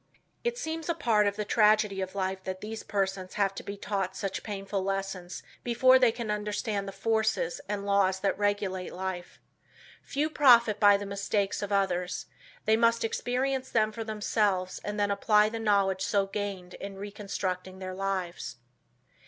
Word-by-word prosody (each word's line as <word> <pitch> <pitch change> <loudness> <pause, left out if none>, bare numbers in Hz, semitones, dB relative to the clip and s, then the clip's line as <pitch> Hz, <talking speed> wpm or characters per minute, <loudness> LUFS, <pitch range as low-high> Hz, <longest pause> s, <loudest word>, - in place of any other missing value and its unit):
It 475 0 -1
seems 320 -5 -4
a 335 - +1
part 220 -9 +3
of 200 - 0
the 210 - -3
tragedy 210 -2 +3
of 190 +1 -5
life 190 -1 -2
that 185 0 -4
these 220 +1 -5
persons 195 -2 -2
have 200 -2 +1
to - - -6
be 200 0 -7
taught 195 -2 -2
such 195 0 -3
painful 195 -1 -3
lessons 195 -2 -3 0.2
before 255 +2 +5
they 250 -3 +5
can 230 -2 -4
understand 210 -1 -2
the - - -4
forces 220 -3 0
and 205 -1 -2
laws 195 -2 +2
that 200 - +1
regulate 205 -3 -1
life. 185 -1 -5 0.6
Few 290 +2 -1
profit 240 -8 +5
by 205 -1 +7
the 205 - -6
mistakes 200 0 -1
of 205 0 -4
others. 180 -2 0 0.4
They 220 - +5
must 230 0 +3
experience 260 +3 -1
them 215 -1 +2
for 225 +1 -5
themselves 210 -3 0
and 210 0 -3
then 205 0 +2
apply 210 +1 +4
the 225 +1 -5
knowledge 200 -3 +2
so 200 0 +2
gained 195 -2 -5
in 200 0 -7
reconstructing 195 -2 -4
their 185 0 -6
lives. 185 -6 -3
205 Hz, 170 wpm, -29 LUFS, 195-220 Hz, 0.6 s, by